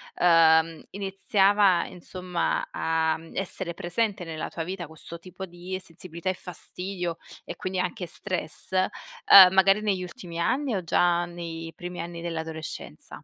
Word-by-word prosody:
ehm, 165 -2 +4
iniziava 195 -1 +3
insomma 180 0 -3
a, 160 0 +1
mhmm, 165 0 -14
essere 190 -2 -2
presente 200 +3 -1
nella 160 -2 -5
tua 165 - -4
vita 180 0 -5
questo 160 +2 -8
tipo 185 +2 -8
di 180 +2 -6
sensibilità 170 +1 -6
e - - +1
fastidio 180 -1 -4 0.3
e - - -6
quindi 185 0 -3
anche 180 0 -2
stress, 180 -1 -3
ehm, 195 - +6
magari 195 +2 +5
negli 195 -3 0
ultimi 170 -1 -8
anni 255 +7 0
o 185 - -2
già 175 +1 +2
nei 165 -1 -7
primi 175 0 -7
anni 170 0 -7
dell'adolescenza? 160 -2 -6
175 Hz, 140 wpm, -26 LUFS, 165-190 Hz, 0.3 s, ehm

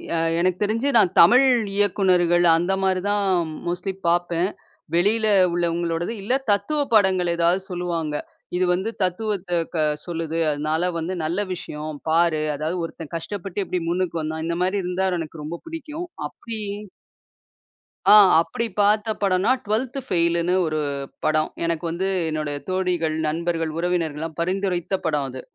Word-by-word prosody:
எ - - +1 0.2
எனக்குத் 185 +2 0
தெரிஞ்சு 225 +6 0
நான் 190 -5 +4
தமிழ் 245 +11 +7 0.3
இயக்குனர்கள் 180 -3 +3
அந்த 175 +3 0
மாரி 190 -1 +1
தான் 205 -1 +1 0.4
மோஸ்ட்லி 180 +2 -2
பாப்பேன். 175 +1 +1 0.5
வெளியில 215 +5 +3 0.3
உள்ளவங்களோடது 170 +2 -1
இல்ல 205 +6 0 0.2
தத்துவ 205 +10 0
படங்கள் 190 -4 +3
ஏதாவது 170 +3 +2
சொல்லுவாங்க. 170 -4 -2 0.4
இது 185 +1 +2
வந்து 190 +5 -1
தத்துவத்தை 185 -1 -1 0.2
க - - 0 0.3
சொல்லுது. 165 -1 -3
அதனால 155 +4 0
வந்து 170 +3 -3
நல்ல 170 +5 -1
விஷயம் 150 -3 -7
பாரு. 165 -1 +3
அதாவது 155 +5 -3
ஒருத்தன் 165 -1 -9
கஷ்டப்பட்டு 195 +3 -4
எப்படி 180 -1 -2
முன்னுக்கு 175 -2 -1
வந்தான். 160 +1 -4
இந்த 170 - -1
மாரி 190 +2 0
இருந்தா 180 +1 -1
எனக்கு 160 -1 -7
ரொம்ப 165 +3 -6
புடிக்கும். 325 +1 -6 0.2
அப்படி 225 -2 -6 1.5
அ - - +9 0.3
அப்படி 170 +8 -3
பார்த்த 210 +2 +3
படம்ன்னா, 190 +4 +2
12த் 245 +6 -1
ஃபெயிலுன்னு 170 -2 +1
ஒரு 155 0 -1 0.5
படம். 155 0 +2 0.2
எனக்கு 165 -1 -1
வந்து 180 +3 -2 0.2
என்னோடய 150 -2 -3
தோழிகள், 180 -4 0
நண்பர்கள், 165 0 -1
உறவினர்கள்லாம் 165 -3 -2
பரிந்துரைத்த 185 0 -1
படம் 145 -3 0
அது. 130 0 -7
175 Hz, 135 wpm, -23 LUFS, 165-195 Hz, 1.5 s, அ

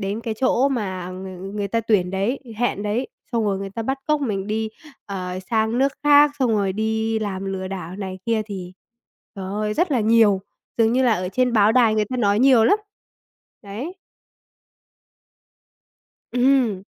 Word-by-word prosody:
đến 200 +3 -3
cái 225 -1 -3
chỗ 260 +1 +3
mà 190 -8 -3
ng 190 +2 -8
người 200 -1 -2
ta 230 +3 0
tuyển 200 -5 +1
đấy, 200 +8 -1 0.2
hẹn 235 -4 -1
đấy, 220 +5 -1 0.2
xong 230 -2 +1
rồi 195 -2 0
người 195 0 -5
ta 225 +3 -4
bắt 270 +4 -2
cóc 300 -1 +2
mình 200 -7 -2
đi, 220 +1 -1 0.4
ờ, 185 -2 -4
sang 220 +1 +1
nước 275 +1 +2
khác, 290 0 +7
xong 255 -3 +2
rồi 200 -3 +1
đi 220 +1 -1
làm 195 -3 -4
lừa 190 -1 -4
đảo 185 -1 -6
này 190 -2 -5
kia, 225 -2 +1
thì, 185 -3 -7 0.6
trời 190 - -5
ơi, 210 +2 -2
rất 350 0 +1
là 250 - +2
nhiều, 215 -3 +4 0.4
dường 225 0 +4
như 255 +2 +2
là 245 -3 +4
ở 180 -2 -3
trên 255 +1 +1
báo 215 -1 +4
đài 230 -3 +4
người 215 - +2
ta 255 +5 -5
nói 205 -4 +2
nhiều 255 -4 +6
lắm, 405 - +4 0.8
đấy. 255 - -7 2.3
Ừm. 245 -6 +2
215 Hz, 180 wpm, -22 LUFS, 195-245 Hz, 2.3 s, khác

